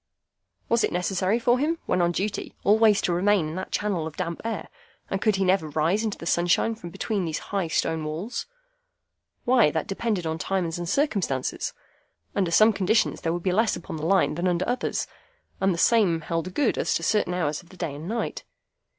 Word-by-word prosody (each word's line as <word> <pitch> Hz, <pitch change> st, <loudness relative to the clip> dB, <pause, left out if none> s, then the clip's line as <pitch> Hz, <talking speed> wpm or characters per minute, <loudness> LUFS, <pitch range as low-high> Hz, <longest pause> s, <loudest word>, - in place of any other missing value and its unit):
Was 235 Hz, 0 st, +2 dB
it -, -, +1 dB
necessary 185 Hz, +3 st, +1 dB
for 240 Hz, +1 st, +2 dB
him 320 Hz, +4 st, +1 dB
when 180 Hz, -, +1 dB
on 175 Hz, 0 st, +3 dB
duty 200 Hz, +4 st, -3 dB
always 215 Hz, 0 st, +4 dB
to 175 Hz, -, +1 dB
remain 190 Hz, -1 st, +2 dB
in -, -, -6 dB
that 185 Hz, -, -5 dB
channel 190 Hz, -7 st, -1 dB
of 160 Hz, -, -9 dB
damp 170 Hz, -2 st, -3 dB
air, 225 Hz, -2 st, -3 dB, 0.4 s
and 195 Hz, -, -1 dB
could 215 Hz, -2 st, +3 dB
he 195 Hz, 0 st, +1 dB
never 185 Hz, -4 st, +2 dB
rise 165 Hz, +8 st, +1 dB
into 215 Hz, -3 st, -2 dB
the -, -, -9 dB
sunshine 175 Hz, +6 st, +2 dB
from 215 Hz, -6 st, -9 dB
between 200 Hz, +3 st, -2 dB
those 160 Hz, -2 st, -2 dB, 0.2 s
high 195 Hz, -4 st, +1 dB
stone 160 Hz, 0 st, 0 dB
walls? 160 Hz, +10 st, -4 dB, 1.0 s
Why, 245 Hz, -8 st, +5 dB
that 160 Hz, 0 st, -2 dB
depended 200 Hz, -3 st, -2 dB
upon 160 Hz, 0 st, -2 dB
times 175 Hz, 0 st, -1 dB
and 175 Hz, -1 st, -4 dB
circumstances. 200 Hz, -, 0 dB, 0.6 s
Under 190 Hz, -4 st, +1 dB
some 215 Hz, +6 st, +5 dB
conditions 205 Hz, +3 st, +1 dB
there 165 Hz, -, 0 dB
would 175 Hz, 0 st, -3 dB
be 185 Hz, -, +1 dB
less 220 Hz, +4 st, +2 dB
upon 160 Hz, -, -7 dB
the 155 Hz, -, -4 dB
Line 195 Hz, -3 st, +3 dB
than 175 Hz, +4 st, -1 dB
under 180 Hz, 0 st, 0 dB
others, 245 Hz, +1 st, -1 dB, 0.5 s
and 195 Hz, 0 st, +2 dB
the 170 Hz, -, -1 dB
same 190 Hz, -5 st, +3 dB
held 165 Hz, +3 st, -3 dB
good 285 Hz, -5 st, +1 dB
as -, -, +1 dB
to 165 Hz, -, -1 dB
certain 185 Hz, -2 st, +1 dB
hours 155 Hz, -4 st, -1 dB
of 175 Hz, -, -22 dB
the 185 Hz, -, -15 dB
day 170 Hz, -5 st, -3 dB
and 150 Hz, +4 st, -7 dB
night. 230 Hz, +3 st, -3 dB
185 Hz, 205 wpm, -25 LUFS, 165-215 Hz, 1.0 s, Why